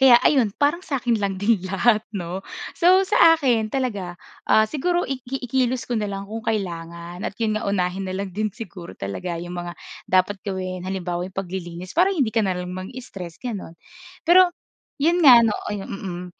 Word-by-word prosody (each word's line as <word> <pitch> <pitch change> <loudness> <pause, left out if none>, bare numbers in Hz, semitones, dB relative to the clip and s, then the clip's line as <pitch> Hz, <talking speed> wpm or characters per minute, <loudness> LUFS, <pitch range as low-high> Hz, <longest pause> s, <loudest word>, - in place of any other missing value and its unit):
Kaya 260 -2 +8
ayun 235 -8 +3
parang 295 +4 +2
sa 290 -6 -3
akin 240 -4 0
lang 195 -1 -1
din 205 0 +2
lahat, 215 +3 +3 0.2
'no? 180 0 -4 0.3
So, 370 +2 +5
sa 330 -4 +6
akin 240 -7 +1
talaga, 205 -9 -3 0.3
ah, 220 - +6
siguro, 345 +9 0
i 265 -1 -4
i 270 0 -4
kilos 255 0 0
ko 245 - -3
na 210 - -2
lang 195 0 -5
kung 220 +3 -6
kailangan, 170 -3 -4
at 195 - -14
yon 215 -2 0
nga - - -3
unahin 190 -1 -1
na 185 - -3
lang 195 -1 -4
din 215 +2 -1
siguro 190 -5 -9
talaga 165 - -4
yong 175 +1 -6
mga 175 -1 -5 0.3
dapat 185 +2 +2
gawin. 185 -2 -4
Halimbawa, 180 -1 -3
yun 190 - -19
paglilinis 180 -1 -5
para 360 +4 +4
hindi 280 - 0
ka 230 - +2
na 190 -4 0
lang 180 0 -5
mang-stress, 185 -3 -8
gano'n. 205 -9 -6 0.5
Pero, 360 +2 +7 0.5
yun 335 +4 +3
nga 250 -5 +9
ano, 225 - +3 0.2
mm, 195 -3 -5
200 Hz, 185 wpm, -23 LUFS, 185-250 Hz, 0.5 s, nga